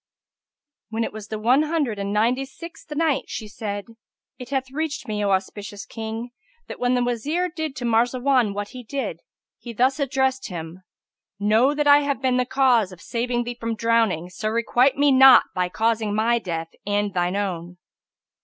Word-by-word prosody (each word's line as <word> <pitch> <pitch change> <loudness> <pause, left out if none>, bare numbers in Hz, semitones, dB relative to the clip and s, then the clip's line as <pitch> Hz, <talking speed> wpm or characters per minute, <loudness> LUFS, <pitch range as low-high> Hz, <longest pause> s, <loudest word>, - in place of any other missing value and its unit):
When 225 +1 -1
it - - -4
was 215 -1 -8
the 215 - -4
One 245 +6 +3
Hundred 300 -9 -1
and 200 0 -3
Ninety 235 +6 +2
sixth 320 +5 -11
Night, 295 -4 +1
She 220 - -6
said, 205 -1 -5 0.5
It 250 - -8
hath 265 -1 -2
reached 310 +1 -3
me, 210 -1 -2
O 200 - +1
auspicious 200 +2 -3
King, 225 +2 -6 0.4
that - - -8
when 250 0 +2
the 245 - +1
Wazir 295 +10 -1
did 315 -4 -5
to 245 - -5
Marzawan 245 -1 +2
what 205 0 -4
he 250 -1 -9
did, 275 +4 -4 0.4
he 235 - -8
thus 260 +5 +2
addressed 265 -1 0
him 170 -1 -7 0.6
Know 220 +8 +3
that 295 0 0
I 290 0 +7
have 285 -1 -1
been 260 -1 +1
the 250 - +1
cause 255 -7 +3
of 180 - -12
saving 240 +4 -2
thee 240 0 -6
from 230 0 -2
drowning 220 -6 +1
so 215 +4 -3
requite 240 +4 +2
me 285 0 +4
not 265 -1 +8
by 180 -1 0
causing 220 0 0
my 235 +2 +2
death 165 -5 -4 0.2
and 205 -1 0
shine 180 0 0
own." 180 -3 -3
235 Hz, 180 wpm, -23 LUFS, 205-265 Hz, 0.6 s, not